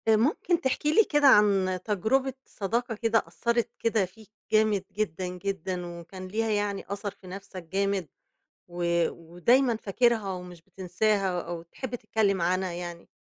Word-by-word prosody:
ممكن 285 +10 +3
تحكي 295 +2 +1
لي 445 - +7
كده 295 -6 +3
عن 195 -6 +5
تجربة 245 +6 +1
صداقة 230 +4 -2
كده 225 +1 +2
أثَّرت 235 0 0
كده 220 -4 +2
فيك 215 +4 -17 0.2
جامد 215 -3 +3
جدًا، 185 -3 -1
جدًا، 180 -1 -3
وكان 185 +2 -9
ليها 220 +4 -1
يعني 205 -1 -1
أثَر 200 +1 -3
في 195 -1 -17
نَفسَك 190 -1 -8
جامد، 195 +1 -1 0.6
و 170 -1 +1
ودايمًا 225 +10 +2
فاكرها 220 -1 +1
ومش 180 -2 -9
بتنساها 190 +1 0
أو 170 0 -6
تحب 235 +9 -6
تتكلم 215 -4 0
عنها 185 +2 +1
يعني؟ 175 -1 -7
200 Hz, 140 wpm, -28 LUFS, 180-225 Hz, 0.6 s, لي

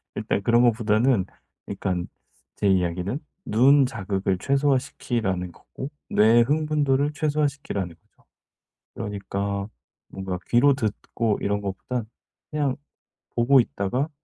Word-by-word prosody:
일단 - - -1
그런 120 +3 +4
것보다는 115 -2 +3 0.4
그러니깐 95 -3 -3 0.5
제 105 - 0
이야기는 95 - +1 0.3
눈 135 +5 +5
자극을 95 -6 -1
최소화시키라는 120 -8 0
거고 130 +9 -9 0.2
뇌의 115 +3 +5
흥분도를 145 0 +1
최소화시키라는 145 - -1
거죠. - - -35 0.7
그러니까 100 -1 -3 0.4
뭔가 95 -1 -4
귀로 130 +4 +5
듣고 110 -2 -1
이런 100 0 0
것보다 100 +5 -3 0.5
그냥 145 -4 0 0.6
보고 125 +3 +5
있다가 125 +5 -1
115 Hz, 285 characters per minute, -24 LUFS, 100-135 Hz, 0.7 s, 눈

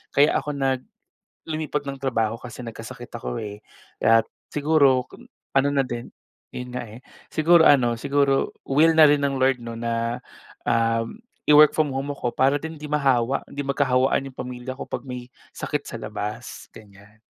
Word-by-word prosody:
kaya 145 +2 +5
ako 150 -1 -5
nag 135 -2 0 0.7
lumipat 155 -2 -3
ng 135 0 -5
trabaho 115 -4 0
kasi 120 0 -10
nagkasakit 115 - -8
ako 60 -1 -4
eh. 105 0 -7 0.4
At, 115 0 +5 0.3
siguro 140 -4 +3 0.5
ano 135 +1 +4
na 140 -1 +2
din 120 -1 -6 0.4
yun 125 0 -7
nga 125 - -3
eh. 115 -1 -10 0.3
Siguro 165 +1 +5
ano, 125 -6 +5
siguro 140 +2 +1 0.2
will 150 +4 +4
na 155 - +10
rin 145 -1 +3
ng 140 -1 0
Lord 130 -1 +2
'no 115 -1 -6
na, 115 0 -2 0.5
um, 115 0 +1 0.3
i-work 150 0 +8
from 150 -4 +1
home 135 +2 -3
ako 125 -4 -3
para 135 +2 +3
din 160 +2 -6
'di 150 -1 -9
mahawa, 135 -3 +1
'di 145 - -5
magkahawaan 135 -1 +1
yung - - -22
pamilya 125 +1 -5
ko, 130 - -7
'pag - - -5
may 125 -1 -7 0.2
sakit - - -3
sa - - -8
labas, 105 +4 -6
ganyan. 105 0 -16
130 Hz, 165 wpm, -24 LUFS, 115-145 Hz, 0.7 s, na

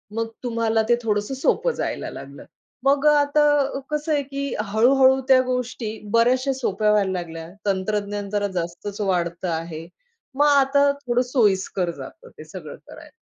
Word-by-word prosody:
मग 225 0 -1 0.2
तुम्हाला 230 -2 0
ते 240 - +6
थोडंसं 210 +3 -1
सोपं 375 - +1
जायला - - -4
लागलं. - - -10 0.4
मग 280 +2 +2
अ, - - +7
आता 290 -1 +2
कसं 300 +1 -2
आहे 285 -1 +1
की 275 +1 -4
हळू-हळू 260 +5 +4
त्या 260 -1 +6
गोष्टी 250 -3 -3 0.2
बऱ्याचश्या 255 +4 +3
सोप्या 215 -4 0
व्हायला 200 -3 +2
लागल्या. 165 -2 -5 0.2
तंत्रज्ञान 205 +1 -2
जरा 205 0 0
जास्तच 175 +5 -5
वाढतं 175 -2 -1
आहे. 165 0 -5 0.5
मग 290 - +4
आता 280 0 +4 0.2
थोडं 245 +1 +2
सोयीस्कर 195 -7 +1
जातं - - -11
ते - - -9
सगळं - - -9
करायला. - - -13
230 Hz, 150 wpm, -23 LUFS, 200-270 Hz, 0.5 s, अ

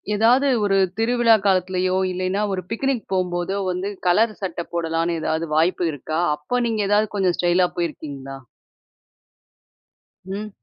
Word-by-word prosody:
எதாவது 240 +6 +4 0.2
ஒரு 195 -1 +2 0.2
திருவிழா 230 0 +4
காலத்திலேயோ! 185 -1 +1 0.2
இல்லயின்னா 185 +3 -1
ஒரு 185 - -2
பிக்னிக் 260 0 -1
போம்போதோ 180 +1 -1
வந்து, 185 +3 -3 0.2
கலர் 215 +5 +3
சட்டை 170 -3 -4
போடலான்னு 165 0 -1
எதாவது 160 +1 -1
வாய்ப்பு 170 +2 +2
இருக்கா? 155 +3 -4 0.2
அப்ப 245 +12 -2
நீங்க 220 -2 -1
ஏதாவது 210 +1 +3
கொஞ்சம் 185 -3 +1
ஸ்டைல்லா 180 +1 +3
போயிருக்கீங்களா? 140 -5 -5 1.9
ம். 200 +3 -5
185 Hz, 125 wpm, -22 LUFS, 170-210 Hz, 1.9 s, எதாவது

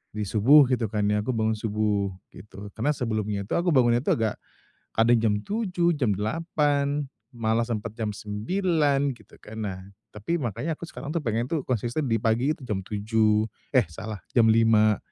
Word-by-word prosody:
di 105 - -3
subuh 115 +9 +6
gitu 125 -2 +1
kan 105 0 -2
ya, 105 - +2
aku 115 +4 -2
bangun 110 0 0
subuh, 105 -2 0 0.2
gitu. 105 -1 -11
Karena 120 +9 0
sebelumnya 110 -5 -2
itu, 100 - -15
aku 175 +1 -1
bangunnya 120 -2 +4
tuh 130 - +1
agak 110 -2 -1 0.6
kadang 115 +1 +4
jam 110 -2 +2
7.00, 180 - 0
jam 125 -7 +1
8.00, 145 - 0 0.3
malah 115 -1 0
sempet 115 -2 -4
jam 110 -2 -2
9.00 140 - 0
gitu 110 - -20
kan. 110 - -11
Nah, 95 -2 -4 0.3
tapi 105 +11 -3
makanya 150 - -3
aku - - -33
tuh 155 +3 -4
pengen 115 +1 0
tuh 160 -1 -1
konsisten 120 +4 -1
di 115 - +2
pagi 115 +5 +1
itu 155 - -12
jam 100 -4 -2
tujuh 105 +2 +1 0.3
eh 125 -6 +5
salah, 105 +5 -7 0.2
jam 115 -2 +5
5.00, 110 -1 +4
115 Hz, 175 wpm, -26 LUFS, 105-140 Hz, 0.6 s, subuh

